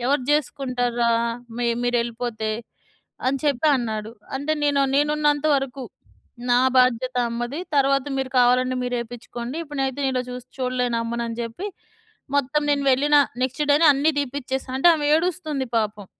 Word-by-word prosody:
"ఎవరు 275 -1 +2
జేసుకుంటార్రా 250 -5 0 0.5
మి 240 - 0 0.2
మీరెళ్ళిపోతే." 235 -2 -1 0.8
అని 275 +1 +1
చెప్పి 285 +1 +2
అన్నాడు. 220 -2 -4 0.3
అంటే 295 +3 -1
నేను 285 -1 +3
నేనున్నంతవరకు, 290 -2 +1 0.7
నా 245 - +5 0.2
బాధ్యత 255 0 +3
అమ్మది. 240 +6 -4 0.2
తరువాత 275 -1 +3
మీరు 265 -1 -3
కావాలంటే 255 +1 +3
మీరు 245 0 -2
ఏపించుకోండి. 240 +3 -7
ఇప్పుడునయితే 275 -2 -3
నేను 265 - 0
ఇలా 255 - 0
చూస్తు 250 0 -8
చూడలేను 250 -2 0
అమ్మనని 235 0 -3
జెప్పి, 235 - -5 0.7
మొత్తం 285 +2 +1
నేను 285 -1 +1
వెళ్ళిన 290 +3 +3 0.3
నెక్స్‌ 265 +4 -1
డేనే 300 +3 +5
అన్నీ 285 +4 +2
తీపిచ్చేసా. 265 -1 -3
అంటే 310 - +4
ఆమె 295 -1 -1
ఏడుస్తుంది 315 -6 -1
పాపం. 210 -2 -2
255 Hz, 135 wpm, -23 LUFS, 240-285 Hz, 0.8 s, నా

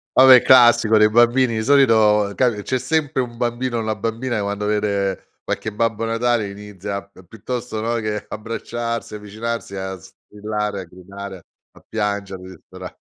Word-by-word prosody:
Vabbè, 130 -1 +8
classico 120 -3 +6
dei 105 0 +5
bambini. 120 +2 +3
Di 110 - -1
solito 110 -7 +4
capi 120 -5 +1
c’è 130 +4 -1
sempre 145 +1 -1
un 120 -1 -8
bambino 120 0 -2
o - - -1
una 110 -1 -2
bambina 115 +3 -3
che, 105 - -1
quando 100 +1 -3
vede 100 -2 -1 0.2
qualche 110 - -3
Babbo 115 0 -1
Natale 115 -2 0
inizia 100 0 -7
p 95 -2 -19
piuttosto, 115 +2 -5
no, 115 +2 -1
che 105 -2 -3
abbracciarsi 115 +1 -5
o - - -4
avvicinarsi, 110 +1 -5
a 95 0 -5
strillare, 105 +2 -6
a - - -7
gridare, 95 +1 -10 0.3
a - - -20
piangere 100 -3 -3
dispera 95 -2 -11
110 Hz, 160 wpm, -20 LUFS, 100-120 Hz, 0.3 s, Vabbè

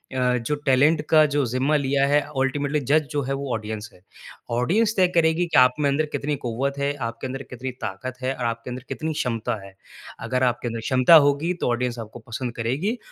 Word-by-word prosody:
अ, 125 -1 +2
जो 120 +5 -2
टैलेंट 145 +4 +4
का 155 -1 +6
जो 145 -1 +2
ज़िम्मा 130 +5 0
लिया 140 -1 +2
है 145 +1 +4 0.2
अल्टीमेटली 145 +2 0
जज 155 +2 +4
जो 145 - 0
है 135 - -2
वो 135 -1 -3
ऑडियंस 110 0 -5
है। - - -19 0.5
ऑडियंस 195 - +2
तय 185 -2 +4
करेगी 165 +1 +3
कि 165 - +1
आपमें 125 +3 +4
अंदर 150 +3 +1
कितनी 145 +1 -2
क़ुव्वत 135 +2 -3
है, 140 +1 0
आपके 115 -1 -5
अंदर 135 +1 -6
कितनी 130 +1 -5
ताकत 120 +6 -5
है 130 +1 -1
और 125 - -4
आपके 115 +1 -3
अंदर 125 0 -6
कितनी 160 -1 -3
क्षमता 115 -6 -2
है। 95 -1 -12 0.5
अगर 130 0 0
आपके 120 -1 0
अंदर 115 0 -3
क्षमता 130 +6 +5
होगी 145 +5 +1
तो - - +1
ऑडियंस 120 0 -1
आपको 110 +1 -8
पसंद 120 +1 -4
करेगी। 140 - -1
130 Hz, 205 wpm, -23 LUFS, 120-145 Hz, 0.5 s, का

